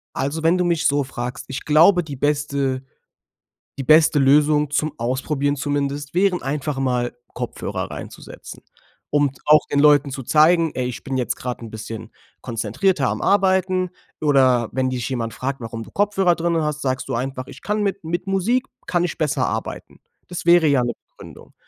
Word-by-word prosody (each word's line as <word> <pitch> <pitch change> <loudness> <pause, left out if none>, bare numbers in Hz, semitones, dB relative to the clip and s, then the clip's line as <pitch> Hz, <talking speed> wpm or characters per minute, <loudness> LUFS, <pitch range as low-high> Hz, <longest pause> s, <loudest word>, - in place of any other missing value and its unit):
Also, 145 +4 -2
wenn 165 +3 +4
du 180 - +1
mich 170 -2 +1
so 145 0 +2
fragst, 125 -2 -6
ich 130 - -5
glaube, 170 +5 +5
die 150 -4 -7
beste 140 -2 -1 1.0
die 135 - -3
beste 155 +1 +5
Lösung 150 +2 +4
zum 150 +1 0
Ausprobieren 135 +4 -1
zumindest, 145 0 -2
wären 185 0 +2
einfach 140 0 -3
mal 125 -2 0 0.2
Kopfhörer - - -4
reinzusetzen, - - -10 0.5
um 145 -2 +2
auch 150 0 +6
den 145 - +1
Leuten 145 -1 +5
zu 135 -1 -6
zeigen: 165 +2 +4
„Ey, 125 -1 -2
ich 125 - -7
bin 135 -1 -3
jetzt 125 - -1
gerade 125 -1 -5
'n 115 - -9
bisschen 110 +1 -7 0.3
konzentrierter 125 - 0
am - - -2
Arbeiten.“ 185 -2 +2 0.3
Oder 130 -6 +3
wenn 130 0 0
dich 125 -3 -3
jemand 115 -3 -3
fragt, 135 +3 -4
warum 115 -1 -6
du - - -15
Kopfhörer 195 -3 +2
drinnen 170 -1 0
hast, 150 0 -2
sagst 130 0 -2
du 130 - -2
einfach: 130 +2 -3
„Ich - - -13
kann 210 0 -1
mit 200 0 -2
mit 175 +3 -3
Musik 210 +7 +1 0.2
kann 175 -1 +1
ich 175 - -3
besser 155 -3 0
arbeiten.“ - - -5 0.3
Das 175 -1 -7
wäre 170 -1 +6
ja 140 -4 +3
'ne 120 - -2 0.2
Begründung. - - -14
145 Hz, 175 wpm, -21 LUFS, 130-170 Hz, 1.0 s, auch